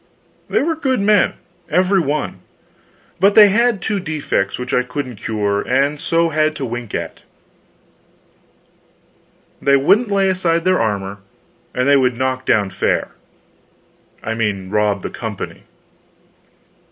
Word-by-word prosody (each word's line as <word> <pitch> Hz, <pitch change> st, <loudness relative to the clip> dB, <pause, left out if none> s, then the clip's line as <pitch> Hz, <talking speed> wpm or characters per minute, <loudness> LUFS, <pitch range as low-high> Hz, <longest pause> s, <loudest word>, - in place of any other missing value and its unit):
They -, -, +1 dB
were 330 Hz, +2 st, +1 dB
good 265 Hz, -6 st, 0 dB
men, 205 Hz, 0 st, +3 dB, 0.4 s
every 185 Hz, +2 st, +3 dB
one, 150 Hz, -2 st, -2 dB, 0.8 s
but 200 Hz, +2 st, +4 dB
they 210 Hz, -2 st, +9 dB
had 230 Hz, -1 st, +1 dB
two 210 Hz, -2 st, -1 dB
defects 150 Hz, -, -2 dB
which 125 Hz, 0 st, -5 dB
I -, -, +3 dB
couldn't 125 Hz, -1 st, -5 dB
cure, 100 Hz, -1 st, -1 dB
and 140 Hz, +3 st, 0 dB
so 165 Hz, +2 st, +1 dB
had 155 Hz, 0 st, +1 dB
to 140 Hz, -, -4 dB
wink 120 Hz, -2 st, -5 dB
at: -, -, -5 dB, 2.4 s
they 140 Hz, 0 st, +4 dB
wouldn't 205 Hz, -, +3 dB
lay 195 Hz, -1 st, +2 dB
aside 175 Hz, -3 st, 0 dB
their 185 Hz, 0 st, +3 dB
armor, 100 Hz, -2 st, -2 dB, 0.6 s
and 125 Hz, +2 st, +1 dB
they 140 Hz, 0 st, +6 dB
would 125 Hz, -2 st, +1 dB
"knock 130 Hz, 0 st, -2 dB
down" 100 Hz, -4 st, +2 dB
fare -, -, 0 dB, 1.1 s
I 110 Hz, -, -2 dB
mean 100 Hz, -4 st, -2 dB
rob 105 Hz, -2 st, +1 dB
the -, -, -4 dB
company. -, -, -7 dB
140 Hz, 135 wpm, -18 LUFS, 115-185 Hz, 2.4 s, they